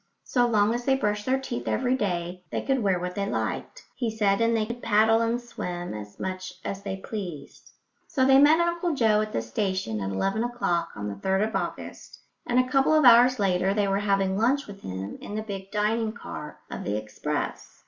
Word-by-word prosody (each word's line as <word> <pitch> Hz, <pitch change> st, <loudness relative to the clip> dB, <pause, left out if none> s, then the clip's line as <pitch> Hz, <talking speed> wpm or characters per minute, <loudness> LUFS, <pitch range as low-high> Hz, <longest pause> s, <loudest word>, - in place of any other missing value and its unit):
So 245 Hz, -2 st, +2 dB
long 215 Hz, -1 st, +3 dB
as 240 Hz, +1 st, -3 dB
they 270 Hz, +1 st, +3 dB
brushed 210 Hz, -4 st, -1 dB
their 260 Hz, +1 st, +3 dB
teeth 255 Hz, -2 st, -5 dB
every 255 Hz, 0 st, +1 dB
day 180 Hz, -5 st, -2 dB
they -, -, -3 dB
could 265 Hz, -2 st, +1 dB
wear 195 Hz, -4 st, +2 dB
what 180 Hz, 0 st, -4 dB
they 200 Hz, +1 st, -2 dB
liked, -, -, -3 dB
he 240 Hz, -3 st, -1 dB
said, 210 Hz, -2 st, +1 dB
and 230 Hz, 0 st, +3 dB
they 215 Hz, -, +1 dB
could 235 Hz, +2 st, -6 dB
paddle 220 Hz, +2 st, +4 dB
and 230 Hz, +1 st, +1 dB
swim 180 Hz, -7 st, -5 dB
as 105 Hz, -1 st, -9 dB
much 185 Hz, 0 st, -4 dB
as 195 Hz, -, -4 dB
they 195 Hz, -1 st, -4 dB
pleased. 180 Hz, -8 st, -7 dB, 0.4 s
So 260 Hz, -3 st, +1 dB
they 270 Hz, 0 st, +7 dB
met 300 Hz, +3 st, +6 dB
Uncle 340 Hz, -1 st, 0 dB
Joe 220 Hz, -4 st, +3 dB
at 215 Hz, 0 st, -3 dB
the 115 Hz, -, -2 dB
station 150 Hz, -, -2 dB
at 95 Hz, -, -2 dB
eleven 195 Hz, -, 0 dB
o'clock 175 Hz, -9 st, -1 dB
on 105 Hz, -1 st, -4 dB
the 100 Hz, -, -3 dB
3rd 190 Hz, -, 0 dB
of -, -, -7 dB
August, -, -, -5 dB, 0.3 s
and 245 Hz, -, +1 dB
a 255 Hz, -, +2 dB
couple 270 Hz, +4 st, +3 dB
of 310 Hz, -3 st, +4 dB
hours 245 Hz, +1 st, +7 dB
later 190 Hz, -1 st, +1 dB
they 205 Hz, -2 st, +2 dB
were 195 Hz, 0 st, +1 dB
having 195 Hz, -2 st, +1 dB
lunch 255 Hz, +7 st, +2 dB
with 200 Hz, -1 st, -11 dB
him 95 Hz, +2 st, -6 dB
in 205 Hz, -, -7 dB
the 215 Hz, -, -2 dB
big 195 Hz, -2 st, -6 dB
dining 215 Hz, +1 st, 0 dB
car 150 Hz, -9 st, -8 dB
of -, -, -5 dB
the 105 Hz, +1 st, -1 dB
express. 110 Hz, 0 st, -4 dB
210 Hz, 215 wpm, -26 LUFS, 185-240 Hz, 0.4 s, they